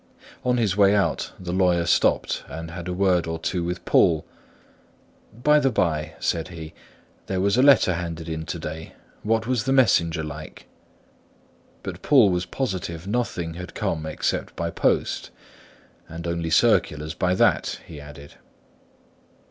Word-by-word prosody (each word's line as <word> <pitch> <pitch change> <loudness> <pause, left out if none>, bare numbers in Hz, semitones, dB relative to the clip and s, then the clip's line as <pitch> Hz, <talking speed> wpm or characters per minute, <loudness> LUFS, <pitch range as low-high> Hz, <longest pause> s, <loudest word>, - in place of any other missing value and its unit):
On 125 0 +1
his 105 -6 +1
way 100 0 +5
out, 100 - 0
the 90 -1 -5
lawyer 90 -2 +2
stopped 85 - +2
and 80 +3 -7
had 85 0 -7
a - - -2
word 90 -2 +2
or 80 0 -2
two 85 +2 -2
with 90 +1 -4
Poole. 80 -3 +3 1.1
"By 150 +7 +3
the 135 -2 +2
bye," 80 -8 -1
said 80 - -1
he, 80 -3 -9 0.5
"there 95 - -1
was 100 +2 +2
a 125 - +4
letter 135 -9 +6
handed 85 -1 -5
in 80 -1 -4
to - - -3
day: 80 +1 -7 0.3
what 110 +1 0
was 120 -3 0
the 135 - 0
messenger 85 -11 +3
like?" 75 0 -8 1.2
But - - -6
Poole 125 -9 +5
was 90 0 -1
positive 95 -9 -4
nothing 100 -7 -2
had 90 +1 -9
come 80 -1 -2
except 80 - -2
by 85 0 -3
post; - - 0 0.8
"and 85 +1 -7
only 85 -1 -2
circulars 75 -1 +2
by 90 0 0
that," - - +2
he 75 -3 -10
added. 70 0 -12
85 Hz, 155 wpm, -24 LUFS, 80-100 Hz, 1.2 s, letter